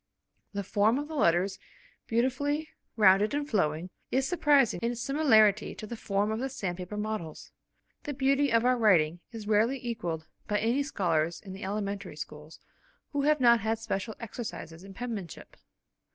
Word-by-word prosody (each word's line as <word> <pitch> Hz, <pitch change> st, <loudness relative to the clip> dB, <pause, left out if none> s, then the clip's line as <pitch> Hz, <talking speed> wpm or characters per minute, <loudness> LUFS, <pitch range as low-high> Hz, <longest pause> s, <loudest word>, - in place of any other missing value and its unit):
The 200 Hz, 0 st, -2 dB
form 210 Hz, +5 st, +2 dB
of 290 Hz, +1 st, -3 dB
the 320 Hz, -, -8 dB
letters, 190 Hz, -, +2 dB, 0.5 s
beautifully 285 Hz, +6 st, 0 dB, 0.3 s
rounded 205 Hz, +3 st, +5 dB
and 290 Hz, 0 st, -2 dB
flowing, 175 Hz, -, 0 dB, 0.2 s
is 265 Hz, +1 st, +1 dB
surprising 285 Hz, -, +3 dB
in 235 Hz, +1 st, 0 dB
its 235 Hz, -, -6 dB
similarity 220 Hz, -8 st, +3 dB
to -, -, -7 dB
the 235 Hz, -, -6 dB
form 205 Hz, -1 st, -1 dB
of 220 Hz, -, -2 dB
the 265 Hz, +2 st, -2 dB
sandpaper 185 Hz, -5 st, -5 dB
models. 210 Hz, -7 st, -5 dB, 0.5 s
The 290 Hz, -, -4 dB
beauty 275 Hz, +1 st, +2 dB
of 230 Hz, +1 st, +3 dB
our 255 Hz, 0 st, +4 dB
writing 175 Hz, -7 st, +4 dB
is 220 Hz, -3 st, -8 dB
rarely 220 Hz, +5 st, +3 dB
equalled 170 Hz, -9 st, -3 dB, 0.2 s
by 210 Hz, -, +1 dB
any 235 Hz, +6 st, +1 dB
scholars 170 Hz, -, 0 dB
in 190 Hz, -2 st, -10 dB
the 190 Hz, -, -8 dB
elementary 200 Hz, -2 st, -3 dB
schools, 150 Hz, +1 st, -9 dB, 0.5 s
who 285 Hz, -2 st, 0 dB
have 300 Hz, +1 st, +3 dB
not 235 Hz, -2 st, +6 dB
had 220 Hz, +2 st, -1 dB
special 220 Hz, -1 st, -4 dB
exercises 210 Hz, -7 st, -7 dB
in 195 Hz, 0 st, -11 dB
penmanship. 215 Hz, -, -6 dB
215 Hz, 165 wpm, -29 LUFS, 190-255 Hz, 0.5 s, not